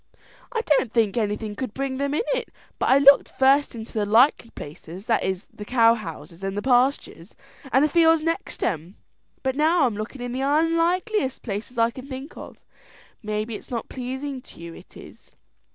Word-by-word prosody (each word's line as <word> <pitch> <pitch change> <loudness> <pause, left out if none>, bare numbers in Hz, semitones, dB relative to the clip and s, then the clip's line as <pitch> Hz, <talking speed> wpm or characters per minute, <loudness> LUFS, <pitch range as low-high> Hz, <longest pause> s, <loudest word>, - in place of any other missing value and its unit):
"I 460 -2 -1
don't 280 - +1
think 225 -4 +1
anything 210 -1 -2
could 250 0 -5
bring 270 -1 -2
them 280 +1 -1
in 320 - +1
it; - - -3 0.3
but - - +1
I 265 - +6
looked 280 0 +6
first 270 0 +3
into 225 -1 -8
the 215 - 0
likely 230 +3 +4
places, 165 +5 -10
that 230 - +2
is, 190 +1 -2
the 210 - -8
cow 230 0 +4
houses, 175 -4 -8
and 195 +1 -3
the 205 - -2
pastures, 250 - +1 0.4
and 265 +4 +4
the - - +3
fields 325 0 +4
next 330 +4 -3
'em, 175 -1 -2 0.5
and 265 0 0
now 315 +2 +3
I'm 235 -5 -1
looking 220 +5 -6
in 245 - -4
the 255 +2 -3
unlikeliest 330 - +1
place 225 +3 -5
I 230 0 +3
can 260 +2 -10
think 270 +3 -8
of. - - -11 0.6
Maybe 215 +1 -3
it's - - -9
not 235 -3 -4
pleasing 265 +1 -5
to - - -16
you 170 0 -8
it - - -15
is." - - -14
250 Hz, 190 wpm, -24 LUFS, 215-280 Hz, 0.6 s, I